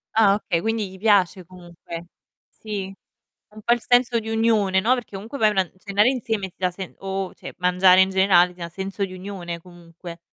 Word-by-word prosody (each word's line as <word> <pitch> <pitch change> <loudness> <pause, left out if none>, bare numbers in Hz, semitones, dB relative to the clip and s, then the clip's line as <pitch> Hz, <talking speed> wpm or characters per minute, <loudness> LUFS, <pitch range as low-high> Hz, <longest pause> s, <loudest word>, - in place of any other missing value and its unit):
Ah, 205 -3 +5
okay, 175 -5 -2
quindi 220 -1 -1
gli 190 - -13
piace 195 -4 +2
comunque. 175 -1 -10 0.4
Sì, 200 -3 -6 0.6
un 215 +1 -13
po' 235 - +4
il 240 - -3
senso 245 0 +3
di 220 - -7
unione, 220 -4 +2
no, 225 +6 +3
perché 240 -6 -5
comunque 225 +8 -8
vai 215 -1 +5
a - - -1
una 190 -1 +2
n 175 - -18
cenare 205 +4 +2
insieme 225 -7 -2
ti - - -31
dà 185 -1 0
sen 185 0 -8
o 195 -1 -4
cioè, - - -10
mangiare 180 +1 +5
in 190 - +2
generale 185 -2 +4
ti 180 - -23
dà 170 0 -5
senso 195 +3 -4
di 185 - -10
unione 180 -3 -6
comunque. 170 -1 -12
190 Hz, 210 wpm, -23 LUFS, 180-215 Hz, 0.6 s, Ah